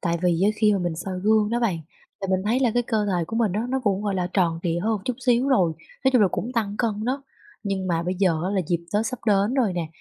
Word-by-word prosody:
tại 170 Hz, -2 st, 0 dB
vì 175 Hz, -1 st, +2 dB
á 210 Hz, -, +4 dB
khi 215 Hz, -1 st, +4 dB
mà 200 Hz, -, +1 dB
mình 175 Hz, -2 st, -2 dB
soi 185 Hz, +2 st, -4 dB
gương 215 Hz, +1 st, +3 dB
đó 240 Hz, +1 st, 0 dB
bạn, 195 Hz, -8 st, +1 dB, 0.4 s
thì 195 Hz, -, -2 dB
mình 190 Hz, 0 st, +1 dB
thấy 235 Hz, +5 st, +1 dB
là 250 Hz, -3 st, +3 dB
cái 245 Hz, -, +3 dB
cơ 215 Hz, -2 st, 0 dB
thể 180 Hz, -4 st, 0 dB
của 225 Hz, -, -4 dB
mình 225 Hz, -5 st, +2 dB
á 210 Hz, -, -1 dB
nó 265 Hz, +1 st, 0 dB
cũng, 200 Hz, -1 st, +1 dB
gọi 205 Hz, -2 st, -1 dB
là, 180 Hz, -1 st, 0 dB
tròn 170 Hz, -4 st, +1 dB
trịa 170 Hz, -1 st, 0 dB
hơn 220 Hz, +1 st, +1 dB
chút 250 Hz, -, -2 dB
xíu 245 Hz, +2 st, +3 dB
rồi, 185 Hz, -12 st, +3 dB, 0.3 s
nói 265 Hz, -, +5 dB
chung 245 Hz, -4 st, +5 dB
là 195 Hz, -, +5 dB
cũng 240 Hz, +6 st, -4 dB
tăng 210 Hz, -4 st, -1 dB
cân 215 Hz, -2 st, -1 dB
đó. 265 Hz, +3 st, -1 dB, 0.4 s
Nhưng 195 Hz, -2 st, -2 dB
mà 170 Hz, -2 st, 0 dB
bây 180 Hz, +2 st, -2 dB
giờ 180 Hz, -4 st, +1 dB
á 185 Hz, -, -1 dB
là 200 Hz, -1 st, +1 dB
dịp 170 Hz, +1 st, +1 dB, 0.2 s
Tết 215 Hz, +2 st, +2 dB
sắp 255 Hz, +3 st, -4 dB
đến 205 Hz, +3 st, +3 dB
rồi 240 Hz, -8 st, +2 dB
nè, 175 Hz, -2 st, -2 dB
205 Hz, 295 wpm, -24 LUFS, 180-230 Hz, 0.4 s, nói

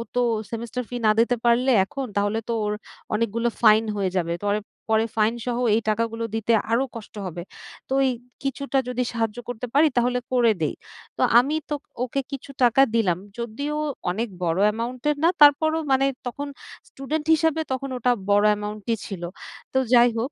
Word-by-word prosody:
তো 245 Hz, -, +3 dB, 0.3 s
semester 235 Hz, +2 st, -4 dB
fee 245 Hz, -, -6 dB
না -, -, +6 dB
দিতে 235 Hz, +2 st, +3 dB
পারলে 240 Hz, +3 st, +4 dB
এখন 275 Hz, +5 st, -5 dB
তাহলে 205 Hz, +2 st, +1 dB
তো -, -, +1 dB
ওর 210 Hz, -, 0 dB, 0.4 s
অনেকগুলো 230 Hz, +2 st, 0 dB
ফাইন 220 Hz, -1 st, +6 dB
হয়ে 195 Hz, -2 st, 0 dB
যাবে। 170 Hz, -1 st, 0 dB
তো -, -, -5 dB, 0.4 s
পরে 220 Hz, 0 st, +3 dB
ফাইন 215 Hz, +1 st, +3 dB
সহ 245 Hz, -1 st, -1 dB, 0.2 s
এই 225 Hz, -, +1 dB
টাকাগুলো 225 Hz, +1 st, -1 dB
দিতে 225 Hz, +1 st, 0 dB, 0.2 s
আরো 235 Hz, +3 st, +3 dB
কষ্ট 225 Hz, -2 st, -9 dB
হবে। 175 Hz, -1 st, -5 dB, 0.5 s
তো -, -, -1 dB
এই -, -, +2 dB, 0.3 s
কিছুটা 275 Hz, 0 st, -2 dB
যদি 250 Hz, 0 st, -1 dB
সাহায্য 225 Hz, -1 st, -2 dB
করতে 245 Hz, 0 st, -4 dB
পারি 300 Hz, +3 st, +5 dB
তাহলে 245 Hz, +1 st, +2 dB
করে 240 Hz, -3 st, +4 dB
দেই।" 155 Hz, -, 0 dB, 0.4 s
তো -, -, -2 dB, 0.2 s
আমি 280 Hz, +5 st, 0 dB
তো 300 Hz, -, 0 dB, 0.3 s
ওকে 255 Hz, +2 st, -1 dB
কিছু 275 Hz, 0 st, -7 dB
টাকা 245 Hz, +2 st, +5 dB
দিলাম। 190 Hz, -7 st, +2 dB, 0.2 s
যদিও 240 Hz, +6 st, -3 dB, 0.4 s
অনেক 225 Hz, +6 st, -2 dB, 0.2 s
বড় 170 Hz, +1 st, 0 dB
অ্যামাউন্টের 245 Hz, +7 st, -1 dB
না 335 Hz, -, +6 dB
তারপরও 315 Hz, +2 st, +6 dB
মানে 265 Hz, 0 st, +4 dB, 0.2 s
তখন 285 Hz, +4 st, -5 dB, 0.4 s
স্টুডেন্ট 300 Hz, +3 st, -4 dB
হিসাবে 320 Hz, 0 st, +1 dB
তখন 265 Hz, +1 st, -2 dB
ওটা 250 Hz, 0 st, +2 dB, 0.2 s
বড় 205 Hz, +1 st, +4 dB
অ্যামাউন্টই 210 Hz, +2 st, -2 dB
ছিল। 195 Hz, -4 st, -6 dB, 0.5 s
তো -, -, +5 dB, 0.2 s
যাই 240 Hz, 0 st, +6 dB
হোক 250 Hz, +5 st, -2 dB
235 Hz, 175 wpm, -24 LUFS, 215-270 Hz, 0.5 s, না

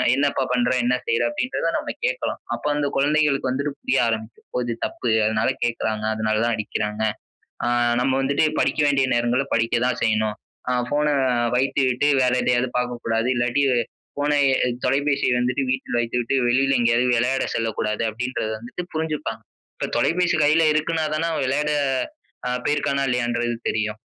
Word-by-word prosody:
"என்னப்பா 140 Hz, -1 st, +1 dB
பண்ற? 125 Hz, -1 st, +2 dB
என்ன 125 Hz, +1 st, +2 dB
செய்ற?" 460 Hz, 0 st, +1 dB
அப்படின்றத 260 Hz, -, -2 dB
நாம -, -, -4 dB
கேக்கலாம். -, -, -2 dB
அப்போ -, -, -5 dB
வந்து 145 Hz, -1 st, 0 dB
குழந்தைகளுக்கு 145 Hz, -1 st, +2 dB
வந்துட்டு 140 Hz, +2 st, -2 dB
புரிய 135 Hz, -, 0 dB
ஆரம்பிக்கும். 110 Hz, 0 st, -5 dB
"ஒ -, -, +1 dB
இது 120 Hz, -1 st, -2 dB
தப்பு. 120 Hz, -, -3 dB, 0.2 s
அதனால 110 Hz, +2 st, +1 dB
கேக்காறாங்க. 110 Hz, -2 st, -1 dB
அதனால 110 Hz, 0 st, 0 dB
தான், 120 Hz, -1 st, +1 dB
அடிக்கிறாங்க. 105 Hz, 0 st, -3 dB, 0.6 s
ஆ -, -, 0 dB, 0.3 s
நம்ம 130 Hz, +1 st, +1 dB
வந்துட்டு 140 Hz, +3 st, +2 dB, 0.2 s
படிக்க -, -, 0 dB
வேண்டிய 135 Hz, -2 st, +2 dB
நேரங்கல்ல 120 Hz, +3 st, +1 dB
படிக்க 115 Hz, 0 st, +1 dB
தான் 125 Hz, -, -1 dB
செய்யணும். 110 Hz, -1 st, +1 dB, 0.3 s
ஆ -, -, +1 dB, 0.2 s
ஃபோன 145 Hz, +3 st, +1 dB, 0.5 s
வைத்துவிட்டு 130 Hz, +1 st, +1 dB, 0.2 s
வேற 125 Hz, 0 st, +2 dB
எதையாவது 125 Hz, 0 st, +2 dB
பாக்கக்கூடாது. 120 Hz, -2 st, -1 dB
இல்லாட்டி 120 Hz, +3 st, +1 dB, 0.5 s
ஃபோனை 145 Hz, +1 st, +1 dB, 0.3 s
எ -, -, +1 dB, 0.2 s
தொலைபேசிய 140 Hz, +1 st, +1 dB
வந்துட்டு 125 Hz, +2 st, 0 dB
வீட்ல 130 Hz, 0 st, -2 dB
வைத்துவிட்டு 120 Hz, +2 st, -1 dB
வெளியில 135 Hz, +2 st, +3 dB
எங்கேயாவது 120 Hz, +1 st, +3 dB
விளையாட 125 Hz, +3 st, +1 dB
செல்லக்கூடாது." 110 Hz, -1 st, -1 dB
அப்படின்றத 125 Hz, 0 st, -3 dB
வந்துட்டு 120 Hz, +10 st, -7 dB
புரிஞ்சுப்பாங்க. 150 Hz, -8 st, -3 dB, 0.4 s
இப்போ -, -, -2 dB
தொலைபேசி 175 Hz, +1 st, +2 dB
கையில 155 Hz, +3 st, +4 dB
இருக்குனா 160 Hz, +1 st, 0 dB
தானே, 165 Hz, +2 st, 0 dB
அவன் 150 Hz, -4 st, -1 dB
விளையாட 150 Hz, +3 st, 0 dB, 0.8 s
அ -, -, 0 dB
போயிருக்கானா, 145 Hz, -1 st, +1 dB
இல்லையான்றது 120 Hz, -1 st, 0 dB, 0.2 s
தெரியும். 110 Hz, 0 st, -2 dB
125 Hz, 150 wpm, -23 LUFS, 115-145 Hz, 0.8 s, கையில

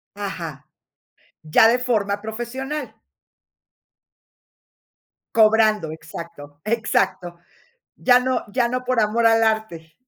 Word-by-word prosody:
Ajá. 170 Hz, -8 st, -7 dB, 0.7 s
Ya 155 Hz, +8 st, +5 dB
de 235 Hz, -, +3 dB
forma 205 Hz, -5 st, -1 dB
profesional. 240 Hz, +7 st, -5 dB, 2.4 s
Cobrando, 215 Hz, -6 st, +3 dB
exacto, 160 Hz, -2 st, -10 dB
exacto. 195 Hz, -6 st, -1 dB, 0.6 s
Ya 250 Hz, -1 st, +4 dB
no 255 Hz, 0 st, -1 dB
ya 240 Hz, 0 st, +1 dB
no 255 Hz, +1 st, -3 dB
por 255 Hz, -1 st, 0 dB
amor 225 Hz, +2 st, +1 dB
al 225 Hz, 0 st, +5 dB
arte. 220 Hz, -8 st, -2 dB
220 Hz, 95 wpm, -22 LUFS, 170-235 Hz, 2.4 s, Ya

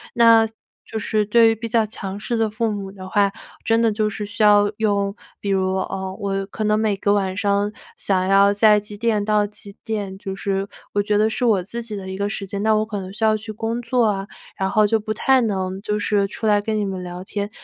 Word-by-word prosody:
那 230 Hz, -1 st, +6 dB, 0.4 s
就 225 Hz, -, -4 dB
是 215 Hz, 0 st, 0 dB
对 225 Hz, +2 st, +5 dB
于 225 Hz, -, +1 dB
比 230 Hz, +1 st, -5 dB
较 225 Hz, 0 st, +2 dB
强 200 Hz, -2 st, -6 dB
势 235 Hz, +2 st, -2 dB
的 220 Hz, -1 st, +1 dB
父 220 Hz, +1 st, -1 dB
母 195 Hz, -2 st, -5 dB
的 185 Hz, -1 st, -9 dB
话， 200 Hz, 0 st, +3 dB, 0.4 s
真 225 Hz, 0 st, +3 dB
的 230 Hz, -, +3 dB
就 215 Hz, 0 st, 0 dB
是 210 Hz, 0 st, -5 dB
需 205 Hz, +3 st, -6 dB
要 205 Hz, -1 st, +5 dB
用， 200 Hz, -2 st, +1 dB, 0.3 s
比 200 Hz, -, -3 dB
如， 190 Hz, -1 st, +1 dB
呃， 190 Hz, 0 st, -3 dB
我 195 Hz, -2 st, -2 dB
可 210 Hz, +2 st, -5 dB
能 215 Hz, 0 st, +2 dB
每 215 Hz, -2 st, +1 dB
个 200 Hz, +1 st, 0 dB
晚 190 Hz, -2 st, 0 dB
上 200 Hz, 0 st, +1 dB, 0.3 s
想 185 Hz, -2 st, 0 dB
要 200 Hz, +1 st, +5 dB
在 210 Hz, 0 st, +5 dB
几 210 Hz, 0 st, -10 dB
点 215 Hz, -2 st, 0 dB
到 210 Hz, -1 st, +2 dB
几 205 Hz, -1 st, -10 dB
点， 205 Hz, -4 st, -4 dB
就 195 Hz, -1 st, -6 dB
是 195 Hz, 0 st, -2 dB, 0.3 s
我 205 Hz, -, +2 dB
觉 210 Hz, 0 st, +1 dB
得 215 Hz, +1 st, +3 dB
是 235 Hz, -, -3 dB
我 215 Hz, -6 st, +3 dB
自 235 Hz, +6 st, -6 dB
己 220 Hz, -2 st, -7 dB
的 190 Hz, -1 st, -7 dB
一 190 Hz, 0 st, -5 dB
个 200 Hz, 0 st, -1 dB
时 200 Hz, -1 st, -4 dB
间， 200 Hz, +1 st, -4 dB
那 220 Hz, 0 st, +3 dB
我 215 Hz, 0 st, +2 dB
可 210 Hz, -3 st, -4 dB
能 185 Hz, 0 st, -8 dB
需 215 Hz, +2 st, -1 dB
要 215 Hz, 0 st, +4 dB
去 215 Hz, +1 st, -6 dB
工 225 Hz, +2 st, -3 dB
作 240 Hz, 0 st, +1 dB
啊， 195 Hz, -2 st, 0 dB, 0.3 s
然 190 Hz, 0 st, -1 dB
后 215 Hz, -1 st, +4 dB
就 225 Hz, -, +2 dB
不 215 Hz, 0 st, -3 dB
太 265 Hz, +4 st, +3 dB
能 190 Hz, -3 st, -2 dB
就 210 Hz, 0 st, -2 dB
是 205 Hz, -1 st, +1 dB
出 220 Hz, +3 st, -4 dB
来 205 Hz, -1 st, +4 dB
跟 215 Hz, +1 st, -2 dB
你 210 Hz, -, 0 dB
们 190 Hz, -2 st, -4 dB
聊 180 Hz, 0 st, -7 dB
天。 200 Hz, +2 st, -4 dB
205 Hz, 265 characters per minute, -21 LUFS, 195-220 Hz, 0.4 s, 那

